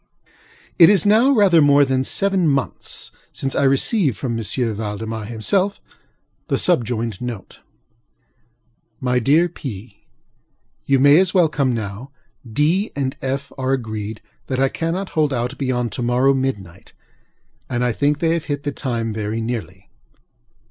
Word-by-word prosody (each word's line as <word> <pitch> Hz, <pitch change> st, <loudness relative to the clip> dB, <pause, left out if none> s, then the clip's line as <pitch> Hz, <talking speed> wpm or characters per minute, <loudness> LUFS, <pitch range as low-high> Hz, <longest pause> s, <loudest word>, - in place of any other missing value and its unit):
It 170 Hz, -, +9 dB
is 200 Hz, -4 st, +3 dB
now 220 Hz, +6 st, +5 dB
rather 200 Hz, -, +5 dB
more 145 Hz, 0 st, +5 dB
than 130 Hz, -1 st, 0 dB
seven 195 Hz, +3 st, +1 dB
months 140 Hz, -2 st, -2 dB, 0.2 s
since 135 Hz, -, -3 dB
I -, -, 0 dB
received, 140 Hz, -, +2 dB
from 120 Hz, +1 st, -3 dB
M. 115 Hz, -, -3 dB, 0.3 s
Valdemar 110 Hz, +1 st, -5 dB
himself, 185 Hz, -, -1 dB, 0.7 s
the -, -, 0 dB
subjoined 115 Hz, -, 0 dB
note: 120 Hz, -6 st, -7 dB, 1.4 s
MY 125 Hz, -1 st, +1 dB
DEAR 150 Hz, +8 st, +3 dB
PŌĆöŌĆö, 115 Hz, -, -8 dB, 0.9 s
You 135 Hz, -1 st, +3 dB
may 145 Hz, +4 st, +6 dB
as 190 Hz, 0 st, +1 dB
well 175 Hz, -4 st, +4 dB
come 135 Hz, -5 st, 0 dB
now. 110 Hz, +4 st, -6 dB, 0.4 s
DŌĆöŌĆö 160 Hz, -, +1 dB
and 135 Hz, -2 st, -3 dB
FŌĆöŌĆö 135 Hz, +1 st, -4 dB
are 130 Hz, 0 st, 0 dB
agreed 110 Hz, -4 st, -4 dB, 0.3 s
that 130 Hz, -1 st, -2 dB
I 135 Hz, 0 st, +3 dB
cannot 170 Hz, +6 st, -3 dB
hold 155 Hz, -2 st, +1 dB
out 125 Hz, +1 st, -2 dB
beyond 125 Hz, -4 st, -1 dB
to 110 Hz, -, -5 dB
morrow 125 Hz, +3 st, +3 dB
midnight; 125 Hz, -10 st, -4 dB, 0.8 s
and 125 Hz, -1 st, -1 dB
I 125 Hz, -, +1 dB
think 145 Hz, +5 st, +1 dB
they 165 Hz, +1 st, +1 dB
have 165 Hz, -2 st, -2 dB
hit 145 Hz, -1 st, -3 dB
the 145 Hz, -, -2 dB
time 115 Hz, -5 st, -3 dB
very 110 Hz, +1 st, -3 dB
nearly. 105 Hz, -5 st, -6 dB
130 Hz, 150 wpm, -20 LUFS, 115-150 Hz, 1.4 s, It